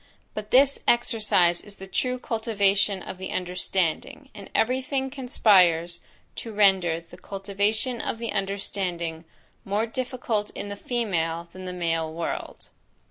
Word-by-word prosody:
But 215 0 -6
this 275 +3 +5
exercise 215 -7 +3
is 205 -1 -10
the 190 - -9
true 250 +7 0
cultivation 205 -4 +1
of 185 - -7
the 190 - -5
understanding; 185 - -1
and 200 - -10
every 255 +3 +2
thing 265 0 -2
conspires 180 - +4 0.4
to 230 - -5
render 190 -5 +4
the 170 +2 -15
cultivation 205 +5 -1
of - - -3
the 230 -1 -3
understanding 190 -4 -2 0.4
more 205 +3 0
difficult 235 -3 -2
in 205 - -5
the 205 - -4
female 170 -8 -1
than 185 +1 -9
the 180 - -4
male 165 -2 -1
world. 165 +1 -5
200 Hz, 135 wpm, -26 LUFS, 180-230 Hz, 0.4 s, this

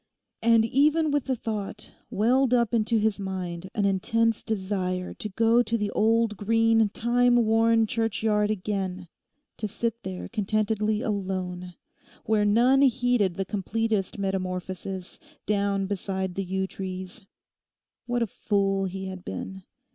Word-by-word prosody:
And 230 -1 +5
even 300 +6 +3
with 290 -2 0
the 265 - 0
thought 215 -4 -5 0.2
welled 250 +4 +3
up 235 -2 +1
into 225 0 +2
his 215 -1 +1
mind 185 -2 -5
an 205 - +1
intense 225 +3 +1
desire 190 -3 -2
to 215 - -6
go 225 +4 +3
to 230 0 0
the 210 -2 -2
old 225 0 +2
green 225 +1 +3
time 245 +3 +2
worn 225 -1 +4
churchyard 220 -1 0
again; 190 -3 -3 0.5
to 215 - -2
sit 230 +2 -3
there 185 -1 -6
contentedly 215 0 0
alone, 185 -3 -3 0.5
where 215 -1 +2
none 245 +6 +4
heeded 245 -7 +2
the 195 - -2
completest 210 +1 -1
metamorphosis, 185 -1 -4 0.3
down 200 -1 0
beside 190 -1 -3
the 195 - -2
yew 190 +1 -1
trees. 190 +2 -7 0.8
What 240 -1 +1
a - - +1
fool 195 -1 0
he 190 +1 -5
had 185 -1 -7
been. 190 0 -6
210 Hz, 135 wpm, -26 LUFS, 190-230 Hz, 0.8 s, And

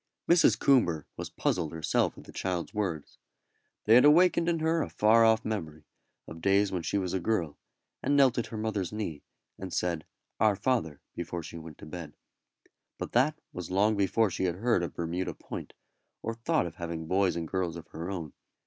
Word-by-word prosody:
Mrs. 170 0 +5
Coomber 85 - +3
was - - -6
puzzled 80 -4 -1
herself 80 -1 0
at - - -11
the - - -13
child's 90 0 -3
words. 95 -8 -3 0.7
They 110 - +5
had 125 - +8
awakened 170 +3 +5
in 170 - +1
her 160 +1 +1
a - - -3
far 110 +2 +4
off 110 0 +4
memory 80 -8 -4 0.4
of 80 0 -10
days 100 +2 +3
when 90 -2 -2
she 85 +5 -1
was 95 -3 -2
a 95 - +1
girl, 85 -6 -1 0.4
and 145 - +2
knelt 130 -3 +5
at 120 - -2
her 110 - -7
mother's 105 -4 -2
knee, 105 -9 -4 0.4
and 95 -1 -6
said, 85 -3 -1 0.3
"Our 110 -2 +4
Father," 100 - -1
before 85 0 -5
she 85 - -8
went 80 -2 -11
to - - -11
bed. 80 -1 -8 0.8
But - - -5
that 145 +6 +3 0.2
was 90 -2 -6
long 105 +4 +3
before 100 +1 +2
she 95 - -1
had 90 -2 0
heard 115 0 +1
of 85 -5 -4
Bermuda 85 +2 -3
Point, - - -8 0.5
or 115 - -2
thought 135 - 0
of 85 - -7
having 85 -2 -4
boys 95 +2 +2
and 85 -1 -3
girls 90 -1 -2
of 85 - -8
her 85 +3 -6
own. 85 -6 -5
95 Hz, 195 wpm, -29 LUFS, 85-110 Hz, 0.8 s, had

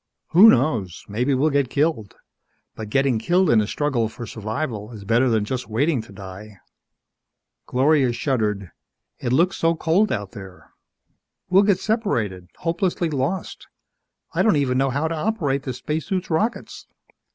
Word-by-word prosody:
"Who 195 +7 +8
knows? 115 - +1
Maybe 125 +7 0
we'll 150 +4 +2
get 140 -3 +1
killed. 140 - -1 0.6
But 110 -1 -7
getting 135 -1 +2
killed 180 +10 +2
in 110 -2 +5
a 105 - -2
struggle 125 -4 -1
for 120 +1 -8
survival 110 0 -4
is 100 -3 -10
better 120 +5 +3
than 110 -3 +1
just 125 +2 -4
waiting 135 +4 +1
to 110 - -15
die." 100 +1 -10 1.1
Gloria 135 0 +3
shuddered. 105 - -1 0.5
"It 120 - -2
looks 175 +8 +2
so 165 0 +2
cold 175 +6 +2
out 105 -5 -3
there. 95 -5 -12 0.8
We'll 190 +2 +6
get 200 -2 +2
separated 115 - -1
hopelessly 170 0 -1
lost. 145 +7 -3 0.7
I - - +1
don't 220 - +4
even 130 -3 +1
know 135 0 +2
how 145 +5 -1
to 165 - -3
operate 155 -6 -1
the 130 - -4
spacesuit's 160 - -3
rockets!" 215 +9 -2
130 Hz, 150 wpm, -22 LUFS, 110-165 Hz, 1.1 s, Who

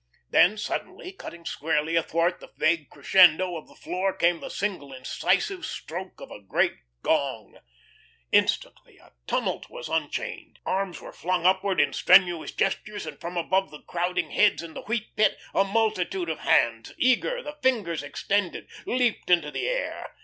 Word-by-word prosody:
Then 205 +5 +5
suddenly, 215 - -4
cutting 170 - -10
squarely 160 +1 -1
athwart 165 +2 +1
the - - -13
vague 155 -2 +1
crescendo 180 +4 +5
of 160 - -8
the - - -18
floor 190 +1 -2
came 170 0 +2
the - - -7
single 185 -9 -3
incisive 245 - -1
stroke 185 +3 -6
of - - -10
a 105 - -9
great 100 - +1 0.3
gong. 135 -9 -1 0.7
Instantly - - +1
a - - -22
tumult - - -1
was - - -8
unchained. - - -3
Arms 195 -1 -2
were - - -10
flung 180 0 -1
upward 190 +1 +3
in 145 - +3
strenuous 175 -3 +4
gestures, 205 +1 -2
and 150 -2 -8
from 175 +1 -5
above 190 +3 +1
the 150 - -12
crowding 175 +1 -2
heads 210 -4 +3
in 165 -1 -9
the - - -7
Wheat 220 0 -3
Pit 215 - +3 0.2
a 195 - +4
multitude 195 -4 0
of 160 - -3
hands, 115 -1 +2
eager, 370 - +2
the 295 0 -8
fingers 225 - +1
extended, 190 +6 -2 0.2
leaped 245 -6 0
into 170 -4 +3
the - - -2
air. - - -3
180 Hz, 160 wpm, -26 LUFS, 160-200 Hz, 0.7 s, Then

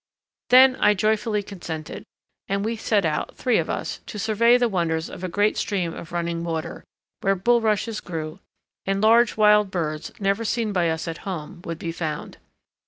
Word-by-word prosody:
Then 260 +1 +7
I 210 - +4
joyfully 215 +1 0
consented 170 -6 -7 0.4
and 200 +1 -1
we 230 +1 -1
set 215 -3 +1
out, 150 -1 -2
three 250 -3 +2
of - - -2
us, - - -3
to 210 - -7
survey 225 +3 +4
the 245 -1 +2
wonders 165 -5 -1
of 180 - -9
a 185 - -2
great 205 +4 +1
stream 180 -5 -1
of 165 - -9
running 170 -1 -2
water, 165 -2 -4 0.4
where 195 -2 +1
bulrushes 220 +1 +1
grew 160 0 -6 0.4
and 195 0 -1
large 225 +2 +4
wild 210 -1 +5
birds, 155 -4 -3
never 200 +2 0
seen 225 -1 -1
by 175 -3 +2
us 160 +1 -3
at 165 - -5
home, 170 -3 -6
would 165 -1 -4
be 165 0 -4
found. 155 -3 -5
195 Hz, 175 wpm, -24 LUFS, 165-220 Hz, 0.4 s, Then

